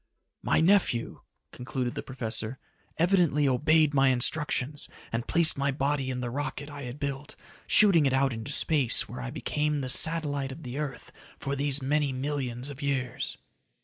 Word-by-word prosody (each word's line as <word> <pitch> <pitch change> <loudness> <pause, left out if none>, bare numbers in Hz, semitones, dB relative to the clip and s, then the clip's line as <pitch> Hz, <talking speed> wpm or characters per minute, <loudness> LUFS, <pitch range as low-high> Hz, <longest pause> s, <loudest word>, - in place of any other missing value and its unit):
"My - - +2
nephew," 170 - +2 0.3
concluded 125 0 -4
the - - -4
professor, 120 -1 -4 0.4
"evidently 170 -5 +3
obeyed 150 +3 +3
my 135 -1 +4
instructions 140 +2 +1 0.2
and 115 +1 -3
placed 165 -4 +5
my 140 0 +1
body 140 0 -1
in 125 -1 -3
the 120 -1 -4
rocket 145 +2 -5
I 140 -2 -7
had 125 +2 -7
built, 140 0 -5 0.3
shooting 175 -9 +6
it 135 - 0
out 135 -1 +2
into 115 +4 -4
space 140 -5 +3
where 125 +1 -8
I 125 - -5
became 150 +1 -2
the 130 - -3
satellite 145 -2 0
of 155 +5 -10
the 125 +3 -5
earth 145 -4 -6 0.3
for 140 0 -3
these 140 0 -1
many 145 +1 +1
millions 130 -2 -3
of 140 0 -9
years." 130 -4 -2
140 Hz, 165 wpm, -28 LUFS, 130-150 Hz, 0.4 s, shooting